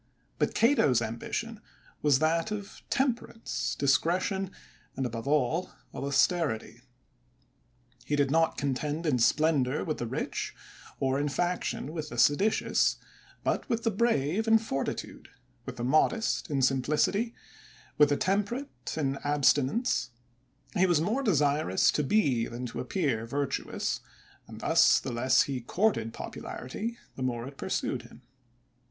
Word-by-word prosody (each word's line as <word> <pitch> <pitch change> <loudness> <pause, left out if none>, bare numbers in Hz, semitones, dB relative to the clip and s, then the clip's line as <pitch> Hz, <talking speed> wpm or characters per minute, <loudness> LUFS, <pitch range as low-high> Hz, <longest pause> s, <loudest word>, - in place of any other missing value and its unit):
But - - 0
Cato*s 225 - +4
ambition 210 - -4 0.4
was 145 -3 +4
that 165 +6 +1
of 205 -1 -6
temperance, 245 -3 -1
discretion, 180 +7 +1 0.5
and, 135 - -2
above 115 +1 -5
all, 150 +4 +1 0.2
of - - -5
aus 140 0 +4
terity; 120 - -3 1.2
he 145 - -1
did 140 -2 +2
not 165 +1 +2
contend 145 +4 -2
in 140 -6 +2
splendor 145 +1 +2
with 155 - -3
therich^ 120 -2 -3 0.5
orin 135 +2 +1
faction 175 -1 -2
with 155 -2 -4
the - - -7
seditious, 195 +10 +3 0.5
but - - -1
with 230 -1 0
the 225 - +2
brave 205 - +1
in 225 0 +7
fortitude, 215 -11 -4 0.4
with - - -5
the 120 - -5
modest 155 - +2
in 140 -3 0
simplicity, 150 - +1 0.6
with 150 -1 +7
the 145 - +2
temperate 210 +8 -2
in 140 -3 -1
abstinence; 145 - +2 0.7
he 185 +1 +4
was 175 -4 +3
more 215 - 0
desir 150 - +2
ous 95 - +4
to - - 0
be, 135 - +2
than 120 +2 -6
to 120 - -6
appear, 125 - -1
virtuous; 140 +2 -2 0.5
and - - -10
thus, - - +5
the - - -5
less 120 +2 +3
he 135 -3 -4
courted 125 - 0
popularity, 220 - -6 0.2
the - - -8
more 125 -1 -2
it 140 - -10
pursued - - -3
bim." - - -17
150 Hz, 135 wpm, -29 LUFS, 130-195 Hz, 1.2 s, in